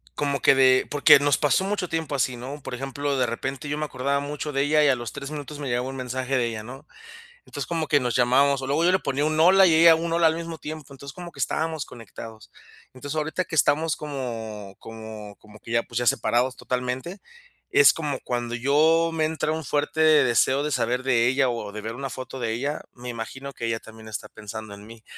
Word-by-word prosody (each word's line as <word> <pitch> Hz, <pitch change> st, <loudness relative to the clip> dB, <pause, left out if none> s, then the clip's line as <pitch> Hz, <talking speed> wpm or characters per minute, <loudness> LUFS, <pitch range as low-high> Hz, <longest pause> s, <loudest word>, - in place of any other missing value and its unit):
como 140 Hz, -2 st, -1 dB
que -, -, +5 dB
de 130 Hz, -1 st, +4 dB
porque 145 Hz, -1 st, +6 dB
nos 145 Hz, -1 st, +2 dB
pasó 150 Hz, +5 st, +2 dB
mucho 195 Hz, -2 st, -2 dB
tiempo 160 Hz, -3 st, -2 dB
así, 125 Hz, -1 st, 0 dB
¿no? 135 Hz, +4 st, -7 dB
Por -, -, -6 dB
ejemplo, 135 Hz, +2 st, -3 dB
de 125 Hz, -, +2 dB
repente, 135 Hz, +4 st, -4 dB
yo 150 Hz, -, -2 dB
me 155 Hz, -, -2 dB
acordaba 140 Hz, 0 st, -1 dB
mucho 145 Hz, +1 st, -4 dB
de 140 Hz, 0 st, +1 dB
ella, 150 Hz, +1 st, +3 dB
y 145 Hz, -, +4 dB
a 135 Hz, -, +4 dB
los 120 Hz, -2 st, -6 dB
3 140 Hz, 0 st, -6 dB
minutos 150 Hz, 0 st, -7 dB
me 140 Hz, -, -4 dB
llegaba 125 Hz, +1 st, -1 dB
un 135 Hz, -, -6 dB
mensaje 130 Hz, +1 st, -3 dB
de 120 Hz, -, +1 dB
ella, 110 Hz, -2 st, -5 dB
¿no? 135 Hz, +6 st, -11 dB, 0.6 s
Entonces, -, -, -5 dB
como 165 Hz, -2 st, -2 dB
que 145 Hz, -1 st, +3 dB
nos 125 Hz, -2 st, -1 dB
llamábamos, 135 Hz, +3 st, +3 dB
o 130 Hz, -, -5 dB
luego 150 Hz, +5 st, +1 dB
yo 180 Hz, -, +5 dB
le 185 Hz, -, +3 dB
ponía 140 Hz, -1 st, -1 dB
un: 155 Hz, 0 st, 0 dB
"Hola", 190 Hz, +4 st, +7 dB
y 165 Hz, -, +4 dB
ella 165 Hz, +1 st, +8 dB
un: 165 Hz, +1 st, -2 dB
"Hola" 170 Hz, -1 st, +3 dB
al 160 Hz, -, +3 dB
mismo 165 Hz, -1 st, -6 dB
tiempo. 150 Hz, -3 st, -8 dB
Entonces 140 Hz, +1 st, -10 dB
como 175 Hz, 0 st, -8 dB
que -, -, -17 dB
estábamos 160 Hz, -2 st, -1 dB
conectados. 110 Hz, -1 st, -11 dB, 0.4 s
Entonces, 145 Hz, +4 st, -6 dB
ahorita 160 Hz, +4 st, -1 dB
que 165 Hz, -, -7 dB
estamos 155 Hz, +2 st, +2 dB
como 115 Hz, -8 st, -6 dB
como 110 Hz, -2 st, -9 dB
como 105 Hz, 0 st, -17 dB
que 115 Hz, -, -12 dB
ya, 115 Hz, 0 st, +2 dB
pues 120 Hz, -, -4 dB
ya 120 Hz, -, -2 dB
separados 125 Hz, +3 st, +1 dB
totalmente, 125 Hz, +9 st, -4 dB, 0.5 s
es 415 Hz, +2 st, +7 dB
como 150 Hz, -4 st, -3 dB
cuando 120 Hz, -1 st, -3 dB
yo 160 Hz, +6 st, +3 dB
me 160 Hz, -1 st, 0 dB
entra 155 Hz, -1 st, -1 dB
un 160 Hz, 0 st, -4 dB
fuerte 145 Hz, +3 st, -1 dB
deseo 140 Hz, -3 st, +4 dB
de 150 Hz, -, -2 dB
saber 125 Hz, 0 st, 0 dB
de 120 Hz, -3 st, +3 dB
ella 130 Hz, 0 st, +2 dB
o 115 Hz, -4 st, -3 dB
de 105 Hz, -, -6 dB
ver 110 Hz, +2 st, -5 dB
una 135 Hz, +1 st, -5 dB
foto 130 Hz, 0 st, -7 dB
de 115 Hz, -2 st, -1 dB
ella, 140 Hz, +6 st, -3 dB
me 125 Hz, 0 st, -10 dB
imagino 130 Hz, +4 st, -6 dB
que 115 Hz, -, -5 dB
ella 115 Hz, 0 st, -1 dB
también 110 Hz, 0 st, -13 dB
está 110 Hz, -, -6 dB
pensando 110 Hz, -1 st, -8 dB
en 100 Hz, +1 st, -12 dB
mí, 115 Hz, -1 st, -14 dB
135 Hz, 235 wpm, -24 LUFS, 120-150 Hz, 0.6 s, ella